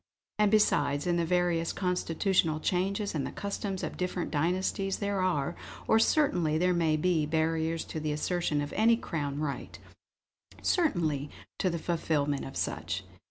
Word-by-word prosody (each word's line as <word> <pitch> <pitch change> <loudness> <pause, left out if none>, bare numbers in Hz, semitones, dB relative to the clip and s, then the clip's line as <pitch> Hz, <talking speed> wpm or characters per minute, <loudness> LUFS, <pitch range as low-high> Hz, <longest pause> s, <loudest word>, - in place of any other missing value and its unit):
And 210 -1 +5
besides, 145 -9 +3
in 175 -1 +1
the 170 - +1
various 175 -1 +1
constitutional 180 -2 +1
changes, 195 +5 0
and 150 -4 -1
the - - -3
customs 200 -1 -4
of - - -4
different 180 -1 -2
dynasties, 185 +5 0
there 200 -2 -1
are, 175 -4 0 0.3
or 220 - +5
certainly 180 - +2
there 180 +2 +2
may 160 -3 +2
be, 160 -2 +1
barriers 160 +1 0
to 160 - -5
the 155 0 -2
assertion 150 0 0
of 145 - -5
any 225 +3 +4
Crown 145 -9 -3
right 150 -2 -4 0.9
certainly 160 - +1 0.3
to 185 - +2
the 170 - -2
fulfillment 150 -4 -1
of 135 - -7
such!" 80 +5 -2
170 Hz, 155 wpm, -30 LUFS, 150-185 Hz, 0.9 s, And